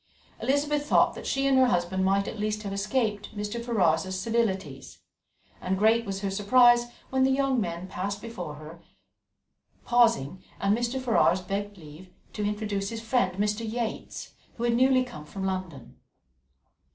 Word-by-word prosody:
Elizabeth 290 +2 0
thought - - +4
that - - -8
she 275 0 0
and 270 -1 +4
her 260 - +5
husband 190 -4 0
might 195 +1 +2
at 220 - -6
least 210 0 -2
have 200 -1 -4
escaped 210 0 -2
Mr. 210 +3 -4
Ferrars's 185 -5 +1
civilities; 190 - -2 0.6
and 190 +1 -1
great 225 +3 +3
was 195 0 -4
her 200 -1 -2
surprise 240 +4 +5 0.2
when 265 0 +1
the 265 - +4
young 265 -2 +1
men 175 -1 -4
paused 195 +2 -4
before 180 -10 -7
her, 155 +3 -11 1.1
and 200 - +2
Mr. 240 +3 -2
Ferrars 225 -7 +2
begged 200 +2 -4
leave 160 +2 -13 0.2
to 210 - -3
introduce 205 -1 -2
his 230 - -5
friend 220 -6 0
Mr. 210 +2 0
Yates, 225 0 -4 0.3
who 235 - -4
had 240 -1 +2
newly 255 +1 +4
come 240 -11 -9
from 190 +5 -7
London. 185 -9 -5
210 Hz, 155 wpm, -27 LUFS, 190-240 Hz, 1.1 s, her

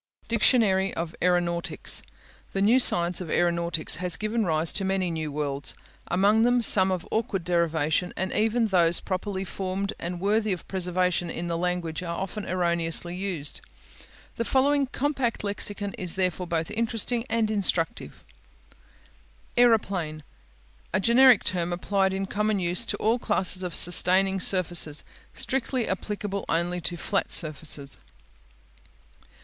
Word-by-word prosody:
DICTIONARY 210 -4 +2
OF 165 -1 -4
AERONAUTICS 175 -1 0 0.5
The 195 - -1
new 235 +5 +4
science 175 -6 +3
of 175 - -7
aeronautics 170 -1 0
has 180 0 -2
given 220 +2 -1
rise 160 0 +1
to 195 - -1
many 190 -2 -1
new 160 -2 -4
words, 140 -1 -3 0.3
among 200 +5 +2
them 245 +1 +3
some 190 -3 +6
of 180 -2 -3
awkward 210 -5 -2
derivation, 170 -1 0
and 190 +1 -3
even 225 +1 +1
those 175 -3 +3
properly 190 +1 -4
formed 195 +1 -4
and 175 +1 -5
worthy 210 +2 +1
of 180 - -8
preservation 180 -2 -1
in 170 - -5
the 170 - -1
language 175 -2 -3
are 170 -1 -5
often 195 +2 -5
erroneously 170 -1 0
used. 180 -6 -4 0.8
The 230 - -1
following 275 +3 +2
compact 265 -4 -2
lexicon 205 0 -2
is 180 -3 -4
therefore 185 -1 -1
both 165 +1 -2
interesting 230 +1 -1
and 225 -1 0
instructive: 195 -1 -1 1.3
Aeroplane 195 -10 +1 0.7
A 190 - +2
generic 240 +3 +5
term 175 -2 -1
applied 190 +2 0
in 195 +1 -3
common 210 +1 -1
use 180 +5 -1
to - - -2
all 225 +3 +1
classes 190 -4 0
of 180 -2 -2
sustaining 190 +2 +6
surfaces; 175 -5 0 0.3
strictly 260 -2 -2
applicable 200 +1 -4
only 175 +2 0
to 175 +1 -3
flat 200 - -2
surfaces. 150 -3 +1
185 Hz, 135 wpm, -25 LUFS, 170-210 Hz, 1.3 s, some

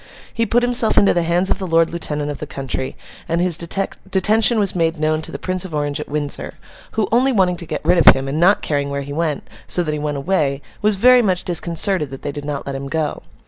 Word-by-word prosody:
He 230 0 -1
put 240 +3 +2
himself 245 -2 +2
into 200 - +5
the 175 - +1
hands 175 +3 +1
of - - 0
the 190 - -4
Lord 165 -1 +2
Lieutenant 150 -3 -3
of 145 - -7
the 150 - -6
county, 135 -1 -5 0.3
and 165 +1 0
his 175 -1 +1
detention 195 +6 +1
was 200 -3 +1
made 165 -1 0
known 155 0 0
to - - -4
the - - -5
Prince 185 -1 -3
of 175 -5 -6
Orange 145 0 -2
at 150 - -7
Windsor—who, 150 - -4
only 255 +4 +3
wanting 185 -6 +2
to 170 - -9
get - - -5
rid 175 +1 +4
of - - +8
him, 135 0 -4
and 145 +3 -2
not 190 +4 +3
caring 145 -2 -1
where 140 0 -3
he 140 +1 -7
went, 155 -2 -2 0.2
so 175 - 0
that 155 -2 -3
he 150 - -3
went 145 -1 -3
away, 140 -3 0 0.2
was 210 0 +2
very 250 +5 +5
much 185 -5 0
disconcerted 170 -1 +1
that 135 0 -10
they 145 - -3
did 145 0 -7
not 145 -1 -4
let 140 - -4
him 135 0 -5
go. 155 0 -2
165 Hz, 245 wpm, -19 LUFS, 145-190 Hz, 0.3 s, of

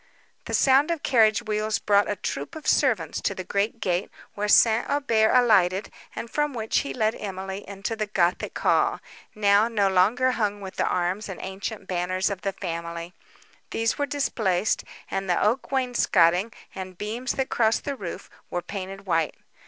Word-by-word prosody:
The - - -1
sound 275 +3 +4
of 335 -3 -2
carriage 225 -3 +4
wheels 215 -1 -1
brought 205 0 +2
a 205 - 0
troop 140 -6 -5
of 315 - -9
servants - - +1
to - - -1
the 185 - -5
great 205 +5 -1
gate, 180 -1 -1 0.2
where 210 0 -2
St. 220 +2 +5
Aubert 230 -7 +2
alighted, 205 -6 +3 0.2
and - - -5
from 295 +2 -1
which 220 -1 0
he 280 - -4
led 220 -2 +1
Emily 195 -1 -6
into 200 +3 -4
the 215 -1 -2
gothic 180 -4 0
hall, - - +2 0.4
now 205 +1 +4
no 210 -4 +1
longer 215 +8 +3
hung 205 -4 -1
with 190 -2 -9
the - - +1
arms 180 +4 -1
and 190 - -6
ancient 195 +2 -5
banners 185 +2 0
of 195 - -5
the 195 -1 -2
family. 170 -1 -5 0.6
These 225 +4 -1
were 285 - 0
displaced, 220 -9 0 0.3
and 195 -1 -2
the 175 - +2
oak 235 +5 +1
wainscotting, 225 -7 +2 0.2
and 185 -1 -7
beams 225 +6 -3
that 265 -1 -2
crossed 225 -1 +2
the 280 - -2
roof, 190 -9 -7 0.2
were 175 0 -3
painted 195 +1 -7
white. 165 -4 0
205 Hz, 175 wpm, -25 LUFS, 185-230 Hz, 0.6 s, St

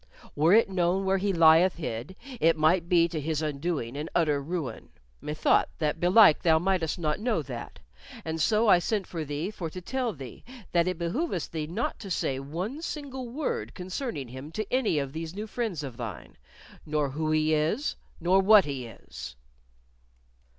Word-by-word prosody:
Were 155 +4 +3
it 225 +3 +6
known 185 0 0
where 190 0 +2
he 200 +1 +1
lieth 165 +1 +6
hid, 125 +1 -5 0.2
it 165 0 +4
might 165 +3 +2
be 170 -2 +5
to 165 -3 -4
his 155 +1 -2
undoing 145 -4 -2
and 150 +3 -4
utter 150 -4 +2
ruin. 150 -6 -5 0.3
Methought 150 +1 +2
that 150 0 -1
belike 180 -1 +6
thou 160 -2 +4
mightest 175 -1 0
not 155 -3 -1
know 240 +3 0
that; - - -7 0.5
and 160 0 -2
so 220 +6 +3
I 180 - +7
sent 200 +2 -1
for 165 -3 -5
thee 150 +6 -3
for 175 -6 -5
to 185 - -7
tell 250 +5 -2
thee 135 - -10 0.3
that 170 0 +3
it 185 -2 -1
behoovest 175 - -2
thee 155 -2 -3
to 200 +3 -3
say 135 -6 -1
not 135 - -8
one 195 - -4
single 270 -6 -5
word 235 - -3
concerning 180 - -4
him 130 +5 -9
to 215 - -2
any 255 -11 +2
of 140 -1 -2
these 165 +2 -5
new 210 +2 -4
friends 215 -8 -3
of 130 -4 -7
thine, 115 -5 -7 0.5
nor 150 -2 -1
who 155 +3 -2
he 155 0 +2
is, 160 - 0 0.2
nor 185 +3 +4
what 205 0 +7
he 135 -4 -4
is." 65 - -10
165 Hz, 180 wpm, -28 LUFS, 150-195 Hz, 0.5 s, I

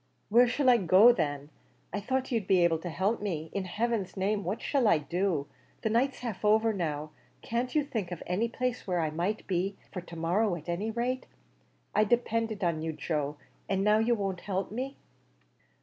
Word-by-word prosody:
"Where 240 +4 +6
shall 260 +3 0
I 245 -1 +7
go 195 +4 +7
then? 145 -7 -2 0.4
I 205 - -1
thought 260 +5 -2
you'd 225 -5 0
be 185 -2 +4
able 165 -2 +3
to 175 - -5
help 190 +8 0
me. 165 -6 -3
In 195 -1 -2
heaven's 210 0 -2
name, 200 +2 0
what 190 +5 -2
shall 270 -5 +1
I 205 - +5
do? 165 0 -1 0.4
the 220 - +1
night's 255 +4 +1
half 230 -5 -5
over 220 +1 +4
now; 155 -5 -3 0.3
can't 245 +3 -2
you 300 - +4
think 215 -10 -4
of 175 - -5
any 195 +6 0
place 250 0 -3
where 180 -2 +1
I 160 -2 0
might 180 +7 -2
be, 190 +2 -1
for 180 - -5
to 170 -1 -11
morrow 175 +5 +1
at 160 -1 -10
any 180 +6 -2
rate? 245 +3 -2 0.7
I 215 - +4
depended 225 -2 0
on 170 -3 0
you, 160 0 -2
Joe, 150 -1 -2 0.3
and 195 0 +1
now 210 +1 +4
you 235 +2 +3
won't 195 -4 -3
help 195 -1 -2
me." 260 +5 -4
200 Hz, 195 wpm, -29 LUFS, 175-230 Hz, 0.7 s, I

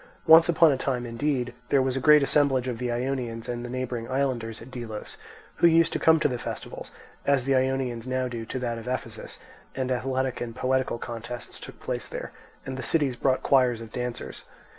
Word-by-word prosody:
Once 165 +1 +8
upon 165 -1 +6
a 135 - 0
time, 125 -2 -2
indeed, 125 +1 -1 0.2
there 140 - +4
was 130 -1 +1
a - - 0
great 150 +1 +6
assemblage 135 -3 +2
of 120 -3 -3
the 125 -1 -1
Ionians 120 -2 -3
and 120 0 -3
the 120 - -6
neighbouring 125 -2 -4
islanders 130 -4 -1
at 120 +3 -12
Delos, 115 -4 -7 0.4
who 170 - +6
used 165 0 +4
to - - -1
come 160 0 +5
to - - +4
the 125 -4 -3
festival, - - -6 0.4
as 140 -2 +2
the 135 +1 +1
Ionians 130 -2 0
now 130 0 0
do 120 -2 -5
to 115 - -5
that 120 -2 -2
of 115 - -10
Ephesus, 130 0 -5 0.4
and 130 -1 -2
athletic 130 +1 -1
and 115 -2 -5
poetical 130 -2 0
contests 120 +1 -7
took - - -10
place - - -4
there, - - -6 0.3
and 130 -1 -5
the - - -4
cities 140 -1 0
brought 130 +1 +1
choirs 125 -4 +3
of 115 -1 -9
dancers. 125 -1 -5
130 Hz, 205 wpm, -26 LUFS, 120-135 Hz, 0.4 s, Once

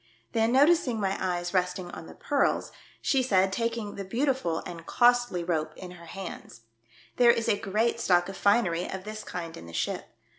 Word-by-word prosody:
Then, 225 0 +2
noticing 275 -3 +4
my 195 -1 0
eyes 175 -1 -2
resting 180 -1 -1
on 160 - -9
the - - -12
pearls, 285 -2 0 0.3
she 270 - +3
said, 195 -6 +2
taking 230 -2 -2
the 200 - -5
beautiful 235 - -1
and 170 -1 -8
costly 245 -7 +3
rope 160 -3 -1
in 180 -1 -8
her 170 -1 -12
hands, 170 -11 -8 0.3
" 115 - -27
There 245 -1 +6
Is 230 -1 +3
a - - +4
great 220 +4 0
stock 175 -5 +3
of 195 - -7
finery 195 -5 +2
of 190 -1 -5
this 215 +1 -7
kind 170 -2 -6
in 85 - -11
the 85 - -11
ship. - - -2
195 Hz, 190 wpm, -28 LUFS, 175-235 Hz, 0.3 s, There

